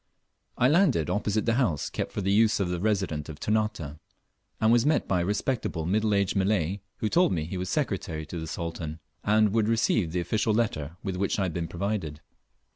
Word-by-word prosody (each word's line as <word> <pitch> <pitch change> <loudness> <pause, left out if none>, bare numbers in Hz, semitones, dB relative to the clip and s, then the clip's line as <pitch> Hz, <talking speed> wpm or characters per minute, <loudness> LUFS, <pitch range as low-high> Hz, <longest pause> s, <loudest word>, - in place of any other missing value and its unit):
I 125 - +4
LANDED 150 - +3
opposite 105 0 0
the 115 - +2
house 85 - 0
kept - - -3
for - - -3
the 95 +1 0
use 110 +1 +4
of 95 -3 0
the 90 -1 -2
Resident 95 -7 -1
of 75 - -8
Ternate, 105 -9 -1 0.6
and 110 0 +4
was 120 -1 +5
met 150 +2 +2
by 90 -2 +1
a - - -1
respectable 105 -5 -1
middle 105 +3 +1
aged 100 0 +1
Malay, 95 -1 +1 0.2
who 110 - -1
told 175 +11 +3
me 85 -4 0
he 85 +5 -5
was 90 +1 -3
Secretary 95 - -2
to 85 +3 -6
the 80 - -5
Sultan, 80 -1 -5 0.3
and 105 -1 +3
would 110 -2 +2
receive 110 -5 +2
the 90 - -1
official 105 +5 0
letter 85 -8 -1
with 95 -2 -3
which 100 +1 0
I 100 - +1
had 90 -3 -2
been 85 0 -2
provided. 90 -5 -3
100 Hz, 205 wpm, -27 LUFS, 85-110 Hz, 0.6 s, was